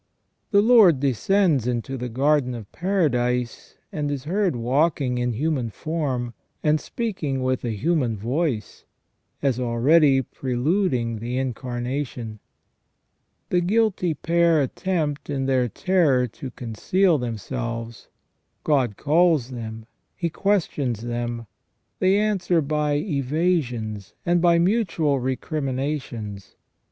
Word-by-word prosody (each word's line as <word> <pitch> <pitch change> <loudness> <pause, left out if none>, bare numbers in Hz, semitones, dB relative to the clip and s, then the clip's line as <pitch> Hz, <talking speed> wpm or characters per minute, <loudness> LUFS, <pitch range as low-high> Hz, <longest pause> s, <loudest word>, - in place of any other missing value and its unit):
The 200 -1 +4
Lord 215 - +6
descends 145 - +2
into 125 +2 -2
the 125 -1 -4
garden 135 +1 +1
of 110 -4 -9
paradise, 125 - -1 0.2
and 150 -2 -2
is 140 -3 -3
heard 185 0 0
walking 130 +1 +1
in 125 0 0
human 135 -1 -1
form, 130 -3 -3 0.3
and 155 0 +2
speaking 155 - -3
with 130 0 0
a 115 -3 -2
human 130 - 0
voice, 125 - -2 0.6
as 130 -3 +1
already 135 +4 +4
preluding 125 - -1
the 120 +3 -3
Incarnation. 125 -2 -4 1.1
The 180 - +2
guilty 190 -3 +1
pair 170 +1 +2
attempt, 150 +1 -2
in 135 -2 -1
their 130 -2 +2
terror, 155 - +2
to 125 +3 -8
conceal 150 - +1
themselves. 115 0 -5 0.6
God 130 -9 +1
calls 155 -4 +3
them; 110 -2 -7 0.3
He 170 -2 -2
questions 155 - 0
them. 120 0 -3 0.5
They 190 +2 +4
answer 200 -5 +1
by 150 0 0
evasions 140 - -1
and 175 0 +2
by 170 -1 +5
mutual 170 - +1
recriminations. 130 -5 -3
135 Hz, 110 wpm, -24 LUFS, 120-170 Hz, 1.1 s, Lord